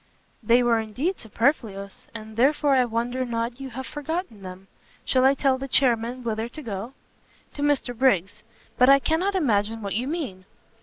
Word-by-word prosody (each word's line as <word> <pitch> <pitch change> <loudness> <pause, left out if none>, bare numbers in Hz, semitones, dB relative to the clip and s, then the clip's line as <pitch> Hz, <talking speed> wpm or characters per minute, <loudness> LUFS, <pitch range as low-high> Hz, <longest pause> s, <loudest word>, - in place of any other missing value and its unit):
"They 235 +2 +4
were 235 -1 +3
indeed 250 - -2
superfluous, 220 -4 -2
and 220 -1 -8
therefore 280 +4 +3
I 255 -2 +4
wonder 240 +2 -2
not 235 0 -3
you 270 -1 -6
have 260 +2 -6
forgotten 295 - -5
them. 185 0 -9 0.4
Shall 255 -1 +2
I 270 +1 +5
tell 270 -2 +1
the 270 - -5
chairmen 245 -1 +1
whither 225 0 -2
to 305 - -9
go?" 220 +2 -5 0.6
"To 285 - -6
Mr 285 -4 0
Briggs. 205 -7 +1 0.4
But 250 +1 +6
I 275 - +8
cannot 340 +8 0
imagine 225 - 0
what 200 - -3
you 240 +5 -1
mean." 270 - -4
245 Hz, 170 wpm, -25 LUFS, 220-275 Hz, 0.6 s, I